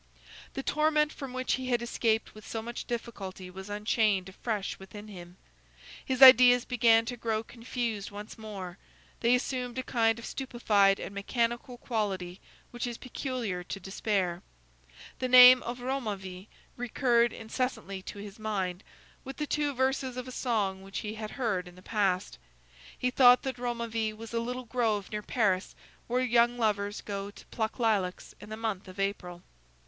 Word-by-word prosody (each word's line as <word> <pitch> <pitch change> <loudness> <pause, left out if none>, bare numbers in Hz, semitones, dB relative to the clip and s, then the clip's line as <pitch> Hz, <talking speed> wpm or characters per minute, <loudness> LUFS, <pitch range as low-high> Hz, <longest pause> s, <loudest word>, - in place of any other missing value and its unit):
The 270 - -3
torment 305 0 +2
from 275 -2 -7
which 255 0 -1
he 260 -1 -2
had 240 -2 +1
escaped 225 -2 0
with 215 - -13
so 225 -1 -4
much 235 +1 -6
difficulty 195 -6 -6
was 190 +2 -9
unchained 210 -2 +1
afresh 205 0 -3
within 205 +2 -10
him. 180 -3 -11 0.7
His 260 0 +3
ideas 250 -1 +9
began 230 -2 +4
to 245 - -4
grow 225 -2 -2
confused 230 -3 -4
once 205 +1 -9
more; 200 -4 -8 0.4
they 240 +1 +4
assumed 250 -1 -3
a 260 - -1
kind 225 -2 +2
of 235 - -8
stupefied 210 -7 +2
and - - -6
mechanical 235 +4 -2
quality 195 -7 -3 0.3
which 240 0 -3
is 240 -1 -5
peculiar 245 -8 -4
to 195 - -5
despair. 190 -2 -1 0.8
The 255 - 0
name 250 0 +10
of 240 +1 -5
Romainville 205 -8 -4 0.3
recurred 240 -1 +2
incessantly 220 -4 -3
to 195 - -8
his 205 +1 -9
mind, 195 -4 -2 0.4
with 270 +1 -8
the 300 - -1
two 295 0 0
verses 260 -1 -1
of 250 0 -5
a - - -7
song 210 -7 -1
which 195 0 -6
he 210 0 -4
had 215 -1 -6
heard 210 -9 -2
in 175 - -13
the 185 - -15
past. 195 -4 0 0.6
He 250 - 0
thought 250 -1 +7
that 260 -2 -4
Romainville 230 -3 -2
was 225 +1 -9
a 230 - +1
little 250 +2 -4
grove 220 -5 -1
near 210 0 -3
Paris, 205 -4 0 0.3
where 250 +2 +1
young 240 -1 +3
lovers 205 -3 0
go 200 -1 -5
to 205 - -14
pluck 220 -1 -2
lilacs 210 -7 0
in - - -11
the 215 - -6
month 220 -4 -3
of 185 +1 -11
April. 180 -3 -3
225 Hz, 165 wpm, -29 LUFS, 200-245 Hz, 0.8 s, name